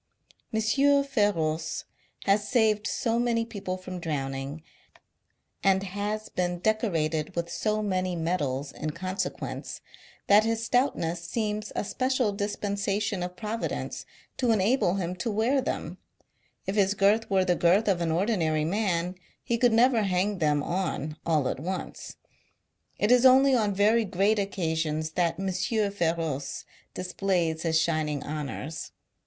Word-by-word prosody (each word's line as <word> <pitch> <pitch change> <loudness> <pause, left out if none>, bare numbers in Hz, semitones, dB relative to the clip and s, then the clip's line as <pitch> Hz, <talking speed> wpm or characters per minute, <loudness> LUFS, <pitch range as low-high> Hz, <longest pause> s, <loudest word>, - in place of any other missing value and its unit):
M. 220 - 0 0.4
Feroce 170 - 0 0.4
has 205 +1 +2
saved 215 -4 +2
so 230 -1 0
many 235 -1 +1
people 200 -5 -5
from 185 -1 -7
drowning, 140 -1 -4 1.0
and 195 0 +3
has 205 +3 -3
been 180 -1 -1
decorated 165 -7 0
with 170 0 -2
so 215 +2 0
many 185 -3 -1
medals 145 -5 -1
in 155 - -4
consequence, 185 +2 -4 0.5
that 205 +1 +6
his 225 0 -1
stoutness 175 -10 +1
seems 210 +3 -2
a - - 0
special 255 +2 0
dispensation 205 0 -2
of 180 0 -4
Providence 220 +3 -4 0.3
to 250 -2 +1
enable 215 -2 +3
him 180 -2 -2
to 230 - -2
wear 230 +6 +2
them; - - -4 0.7
if 195 - -2
his 200 -1 +3
girth 205 +3 +3
were 190 -2 +3
the 180 - +3
girth 180 +6 +3
of 185 -4 +2
au 170 - 0
ordinary 165 -4 +1
man, 180 -1 0 0.3
he 235 - 0
could 240 +1 +3
never 235 +1 +4
hang 195 0 0
them 150 -2 +2
on, 165 -5 -2
all 155 -5 +2
at - - -2
once. 185 +5 -5 0.8
It 210 - +2
is 250 0 +6
only 265 +1 +7
on 210 -5 +2
very 215 +3 +4
great 200 +3 +2
occasions 160 -5 -1
that 170 +1 0
M. 195 0 -1 0.4
Foroce 165 -7 -2 0.3
displays 180 -3 -1
his 160 -1 +2
shining 155 -4 0
honours. 150 +1 -5
190 Hz, 135 wpm, -27 LUFS, 165-215 Hz, 1.0 s, only